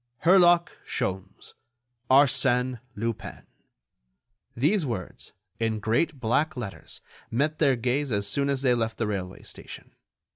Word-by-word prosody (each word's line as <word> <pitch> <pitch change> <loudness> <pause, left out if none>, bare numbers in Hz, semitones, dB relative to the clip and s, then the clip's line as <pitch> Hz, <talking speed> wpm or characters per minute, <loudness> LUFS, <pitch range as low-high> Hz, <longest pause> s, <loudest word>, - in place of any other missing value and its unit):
HERLOCK 175 0 +5
SHOLMES—ARSÈNE 120 +6 -1 0.2
LUPIN. 115 +1 -5 1.1
These 160 - +2
words, 115 -10 -5 0.3
in 115 -1 0
great 130 +8 0
black 130 +6 0
letters, 100 -9 -7 0.3
met 150 +6 0
their 140 -4 +4
gaze 130 +4 -1
as 100 -1 0
soon 140 +8 0
as 140 -1 -1
they 125 -2 +4
left 115 -2 -1
the 115 - -1
railway 95 -3 -4
station. - - -11
125 Hz, 115 wpm, -26 LUFS, 110-140 Hz, 1.1 s, HERLOCK